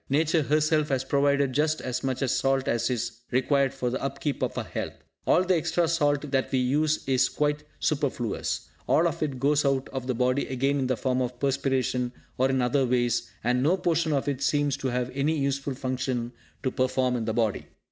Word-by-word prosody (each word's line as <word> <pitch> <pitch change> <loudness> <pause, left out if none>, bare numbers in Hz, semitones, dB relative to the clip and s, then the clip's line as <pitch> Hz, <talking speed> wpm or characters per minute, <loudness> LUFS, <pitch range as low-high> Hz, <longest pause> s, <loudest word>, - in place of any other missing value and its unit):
Nature 155 +3 +2
herself 155 +1 +2
has 135 -2 0
provided 140 0 +2
just 155 +2 +1
as 125 -1 -3
much 130 0 -1
salt 135 +1 +1
as 120 +1 +1
is 120 -1 -3
required 135 +1 +2
for 130 -2 -2
the 130 - -3
upkeep 135 +1 -3
of - - -1
our - - -1
health. - - -5 0.3
All 180 - +5
the 185 0 +2
extra 165 +1 +1
salt 145 -3 +1
that 135 -1 0
we 130 - +2
use 150 +5 +1
is 130 -2 +3
quite 150 0 0 0.2
superfluous; 140 -7 -1 0.2
all 170 - +4
of 165 - -4
it 140 -5 -2
goes 145 +2 +3
out 135 -2 +1
of 130 -2 -5
the 130 - 0
body 125 +3 +1
again 135 +2 0
in 130 - 0
the 130 -2 0
form 130 0 0
of 125 -1 -3
perspiration, 130 -2 0 0.3
or 130 +1 +3
in 130 -1 +1
other 130 +2 +2
ways, 120 -5 +1
and 125 +2 +2
no 165 +8 +3
portion 165 -3 +1
of 140 -2 0
it 140 -2 -1
seems 145 -1 +1
to 140 -1 -3
have 125 0 -1
any 145 +4 0
useful 140 -1 -1
function 130 -2 -2 0.3
to 130 - 0
perform 130 0 +1
in 115 -2 -2
the 110 - -1
body. 110 -4 0
135 Hz, 205 wpm, -27 LUFS, 125-145 Hz, 0.3 s, All